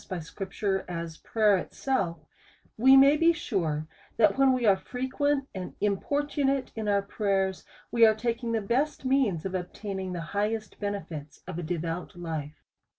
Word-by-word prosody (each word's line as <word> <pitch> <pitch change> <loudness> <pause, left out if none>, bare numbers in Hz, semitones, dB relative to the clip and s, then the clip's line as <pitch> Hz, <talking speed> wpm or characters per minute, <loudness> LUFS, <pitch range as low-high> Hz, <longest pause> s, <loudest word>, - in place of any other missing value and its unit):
207 185 -3 -5
by - - -7
scripture, 195 +2 -3
as 170 -2 -5
prayer 215 -3 +3
itself, 180 - -2 0.5
we 265 +4 +7
may 275 +2 +7
be 330 +2 +5
sure, 160 - -2 0.3
that 210 -3 +5
when 270 -1 +5
we 255 -2 +1
are 200 -2 +6
frequent 265 +6 -1
and 185 -2 -6
importunate 275 - 0
in 220 -1 -3
^our 200 -1 +1
pray 205 -1 -1
ers, 190 -1 -4 0.3
we 235 -1 +4
arc 220 -1 +6
taking 235 +1 -2
the 225 -1 +1
best 260 +8 -1
means 255 - +2
of 190 - -3
obtaining 190 +1 -4
the 170 -2 -4
hig 205 +2 +1
hest 220 -1 -6
benefits 170 -8 -5
of 165 - -5
a - - -2
devout 170 +1 -4
life. 160 -4 -6
205 Hz, 170 wpm, -28 LUFS, 180-255 Hz, 0.5 s, we